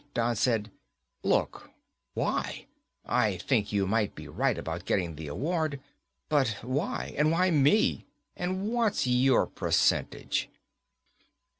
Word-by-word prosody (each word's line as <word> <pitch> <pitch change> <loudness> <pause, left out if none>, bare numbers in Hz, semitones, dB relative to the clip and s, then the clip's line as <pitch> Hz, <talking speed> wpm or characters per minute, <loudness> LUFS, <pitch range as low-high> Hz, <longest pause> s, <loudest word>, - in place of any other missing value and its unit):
Don 120 0 +1
said, 110 -2 +1 0.5
"Look. - - 0 0.5
Why? - - -2 0.4
I 105 -6 +1
think 105 +2 0
you 100 -2 +1
might 105 +1 0
be - - -9
right - - 0
about 85 +3 -5
getting 85 -4 0
the 80 0 -7
award. 155 - -1 0.5
But 135 -8 +1
why, 135 - -2
and 155 +1 +4
why 180 +2 +3
me, 150 +7 +3 0.3
and 185 +3 -2
what's 230 - +1
your 125 +1 +4
percentage?" - - 0
125 Hz, 120 wpm, -29 LUFS, 105-155 Hz, 0.5 s, and